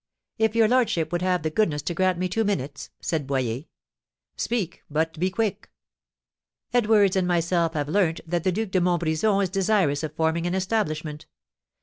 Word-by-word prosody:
"If 220 0 +2
your 225 -1 +5
lordship 215 -10 +1
would 175 0 -1
have 180 -3 +1
the 155 - -1
goodness 155 -6 +1
to 175 - -2
grant 185 +1 +1
me 185 +1 0
two 225 +5 0
minutes," 145 -9 -3
said 155 -5 -2
Boyer. 130 0 -1 0.7
"Speak, 210 -8 -2
but 160 +1 -1
be 185 +2 +2
quick!" 210 +2 -2 1.0
"Edwards 210 -5 +4
and 185 -2 +1
myself 170 -1 +1
have 145 -1 -1
learnt 165 0 +1
that 170 0 -1
the 185 - +2
Duc 215 +1 -2
de 185 - +2
Montbrison 175 +3 +1
is 190 - -1
desirous 190 -7 +2
of 155 -1 -5
forming 160 +2 0
an 175 - -1
establishment. 155 -7 -2
175 Hz, 170 wpm, -25 LUFS, 160-200 Hz, 1.0 s, your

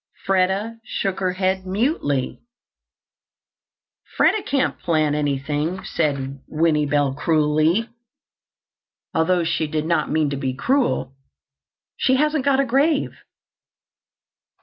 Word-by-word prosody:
Freda 195 +4 0
shook 195 -5 -3
her 185 -1 0
head 190 0 -1
mutely. 190 - -1 1.8
"Freda 430 - +3
can't 275 -2 0
plant 155 -3 +1
anything," 150 +4 -2
said 140 -4 -2
Winnie 155 -2 +1
Bell 145 -1 +1
cruelly, 155 +7 +2 1.3
although 170 +2 +2
she 160 -1 -1
did 155 0 -2
not 170 +1 0
mean 155 -2 +1
to 140 - -2
be 130 -1 -2
cruel. 245 - 0 0.8
"She 260 - +2
hasn't 300 0 +1
got 275 -1 +3
a 275 - +3
grave." 275 +4 +1
165 Hz, 105 wpm, -22 LUFS, 150-225 Hz, 1.8 s, Freda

